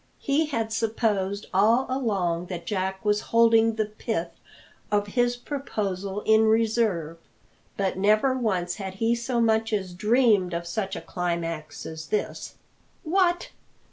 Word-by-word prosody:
He 295 +3 +1
had 225 -6 -2
supposed 215 -3 0
all 225 +7 +4
along 195 -10 -1
that 175 -1 -6
Jack 190 0 -3
was 210 0 +2
holding 225 -1 +4
the 215 -1 0
pith 210 -5 -4 0.6
of 205 -1 +2
his 245 +2 +1
proposal 205 -7 -4
in 220 +1 +4
reserve; 220 -7 +1 0.6
but 190 -1 -1
never 215 +6 +3
once 185 -7 -1
had 190 -2 -6
he 225 +4 +1
so 235 +1 -1
much 225 -1 +2
as 190 -4 -2
dreamed 210 -3 +3
of 170 0 -3
such 195 +2 -3
a - - -5
climax 165 -2 -4
as 160 -1 -7
this. 210 - -3 0.5
"What! 350 +1 +1
210 Hz, 140 wpm, -26 LUFS, 185-230 Hz, 0.6 s, all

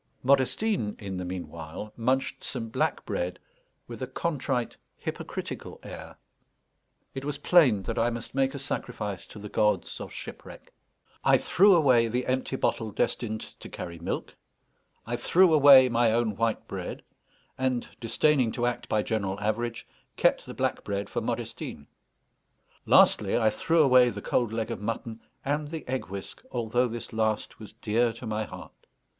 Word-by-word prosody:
Modestine, 135 - +2
in 95 -3 -5
the 90 - -4
meanwhile, 90 +2 -7
munched 130 +3 0
some 115 -4 -4
black - - -1
bread 90 +1 -2 0.5
with - - -9
a - - -2
contrite 130 -7 -2 0.2
hypocritical - - -6
air. - - -9 1.0
It 135 - -5
was 145 0 -3
plain 145 - +4
that - - -2
I 115 +1 +3
must 115 -1 -6
make 135 +1 +1
a - - -3
sacrifice 105 -8 -4
to - - -12
the 105 0 -7
gods 105 -3 0
of - - -7
shipwreck. - - -10 0.5
I - - +6
threw 195 +1 +5
away 130 -8 +5
the 125 +3 -1
empty 130 +1 -1
bottle 115 -3 0
destined 110 +2 -1 0.2
to - - -9
carry 85 -2 -7
milk; 85 - -4 0.7
I 120 +1 -2
threw 175 +7 +4
away 140 -3 +9
my 120 -1 +3
own 115 -2 +1
white 115 +1 -1
bread, - - -6 0.5
and, 130 -2 -1
disdaining 130 +1 +2
to 120 - -1
act 120 0 -2
by 105 -1 +2
general 100 -3 -2
average, 115 +3 -2 0.3
kept - - +2
the - - -7
black - - -1
bread 100 0 -3
for - - -1
Modestine; 70 - -4 1.0
lastly, - - +5
I 110 -2 +3
threw 165 +6 +3
away 125 -3 +6
the 105 -3 -6
cold 115 +2 0
leg 115 +1 -2
of 115 - -5
mutton 115 +1 -4 0.2
and 145 +2 0
the 160 +1 -7
egg 130 +1 -2
whisk, 95 0 -7
although 120 +1 +1
this 115 -1 -6
last 110 -1 -1
was 110 -1 -10
dear 115 +1 +1
to 115 - -10
my 110 0 -2
heart. 90 -5 -10
115 Hz, 160 wpm, -28 LUFS, 105-130 Hz, 1.0 s, away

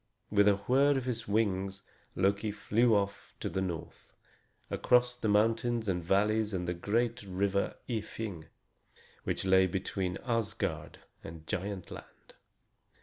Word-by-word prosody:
With 100 -1 +5
a 100 - +6
whirr 135 +7 +3
of 130 - -2
his 120 -2 -3
wings 100 -2 0 0.3
Loki 100 +3 +1
flew 110 +2 +2
off 100 -1 -2
to - - -3
the 95 - -2
north, 85 -4 -6 0.6
across 125 0 +2
mountains 115 +2 +2
and 90 -3 0
valleys 105 +3 +2
and 90 -1 -2
the 90 - 0
great 115 +7 0
river 100 0 -1
Ifing, 110 -7 -4 0.8
which - - -2
lay 95 0 +5
between 95 0 -2
Asgard 115 -4 -2 0.2
and 80 -1 -9
Giant 95 +2 -4
Land. - - -12
100 Hz, 130 wpm, -31 LUFS, 95-115 Hz, 0.8 s, a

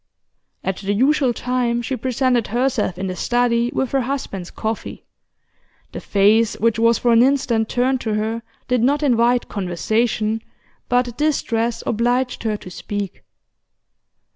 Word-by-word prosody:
At 190 -1 -2
the 200 0 -2
usual 265 +3 +3
time 240 0 -1
she 260 - -2
presented 250 -1 0
herself 240 -5 0
in 190 - -3
the 185 -1 -3
study 240 +1 +1
with 265 - -1
her 270 - +2
husband's 235 -9 -4
coffee; 220 0 -5 0.9
the - - -6
face 210 +3 +3
which 225 0 +1
was 230 0 +4
for 240 -1 +2
an 230 - +6
instant 245 -4 +2
turned 255 +1 +1
to 220 -2 -1
her 220 +2 -2 0.3
did 250 -2 +1
not 285 +5 +2
invite 240 -2 +3
conversation, 215 +4 -1 0.5
but 245 -1 +1
distress 235 -6 0
obliged 245 +3 0
her 220 -2 -1
to 185 - -11
speak. 205 0 -5
235 Hz, 140 wpm, -20 LUFS, 215-250 Hz, 0.9 s, an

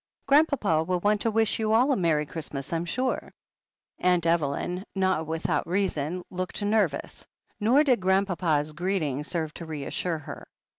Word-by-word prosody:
"Grandpapa 275 - +3
will 180 +1 -1
want 210 +1 +2
to 230 - +1
wish 225 0 +1
you 220 0 +1
all 250 +6 +4
a - - +3
Merry 160 -6 +1
Christmas, 145 -2 -6
I'm 165 +1 -1
sure." 255 +9 -2 0.6
Aunt 180 -2 +2
Evelyn, 170 +2 0
not 185 -4 +1
without 160 -1 -1
reason, 180 -2 -1
looked 185 +2 -4
nervous, 210 +1 0 0.3
nor 245 +8 +4
did 255 -6 +3
Grandpapa's 180 -5 +1
greeting 155 -5 -1
serve 160 -1 -3
to 170 - -8
reassure 160 +3 -3
her. 155 - -9
180 Hz, 150 wpm, -27 LUFS, 160-205 Hz, 0.6 s, all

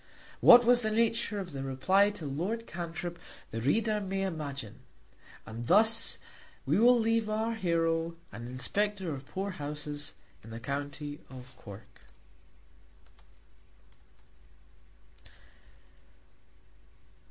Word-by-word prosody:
What 240 0 +9
was 245 0 +5
the 220 - 0
nature 225 -1 +1
of 185 -2 -6
the 135 -2 -5
reply 135 +10 +3
to 205 -6 -7
Lord 185 +12 -3
Cantrip 170 -1 -6 0.3
the 115 - -4
reader 215 - +1
may 195 0 -2
imagine, 140 - -5 0.7
and 115 +3 -7
thus 225 - +4 0.5
we - - +2
will 245 +2 +6
leave 225 -1 +1
our 220 +2 0
hero 165 -4 0 0.2
an 120 +1 -8
Inspector 195 +10 -1
of 135 -1 -8
Poor 195 +6 -3
Houses 150 -3 -5 0.3
in 110 - -12
the 115 0 -7
County 145 +3 -5
of 125 -1 -11
Cork. 100 -3 -13
170 Hz, 105 wpm, -30 LUFS, 140-215 Hz, 0.7 s, What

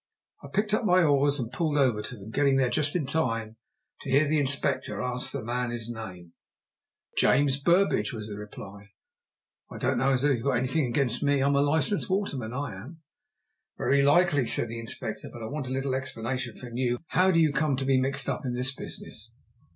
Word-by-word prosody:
I - - -10
picked 210 +2 -1
up 215 - +2
my 185 -3 +4
oars 145 -1 +3
and 120 -2 -4
pulled 150 +1 -1
over 125 -7 +2
to 125 - -5
them, 100 +2 -10
getting 140 +2 +2
there 130 -2 +2
just 150 0 +1
in 165 -5 0
time 115 -7 -1 0.4
to - - -8
hear 145 +3 +4
the 155 +1 +2
Inspector 135 -1 0
ask 125 0 0
the 140 - -4
man 120 +2 -2
his 120 -1 -5
name. 90 -7 -9 0.9
"James 140 -1 +3
Burbidge," 175 +3 +2
was 110 -3 -6
the 105 - -6
reply. 100 -1 -10 0.8
"I - - -7
don't - - 0
know 135 +2 +2
as 130 0 0
how 145 - +4
you've 125 -5 +1
got 135 0 +1
anything 130 +4 0
against 125 0 0
me. 145 -2 +2
I'm 140 +1 +2
a 140 - +3
licensed 155 +8 +1
waterman, 145 - -2
I 130 -2 -4
am." 130 - -11 0.8
"Very 140 0 +2
likely," 145 -2 +3
said 120 - +2
the 115 0 -5
Inspector; 110 -1 -5
"but 120 - -9
I - - -4
want 140 +3 -4
a - - -5
little 135 0 -1
explanation 125 -2 -3
from 120 -2 -8
you. 125 -1 0
How 185 +1 +3
do 170 -3 +3
you 155 -3 +3
come 150 -1 +1
to 135 +1 -3
be 135 -1 +3
mixed 135 +1 0
up - - -2
in 125 -2 -3
this 125 +2 +1
business?" 115 -3 -7
135 Hz, 210 wpm, -27 LUFS, 120-145 Hz, 0.9 s, my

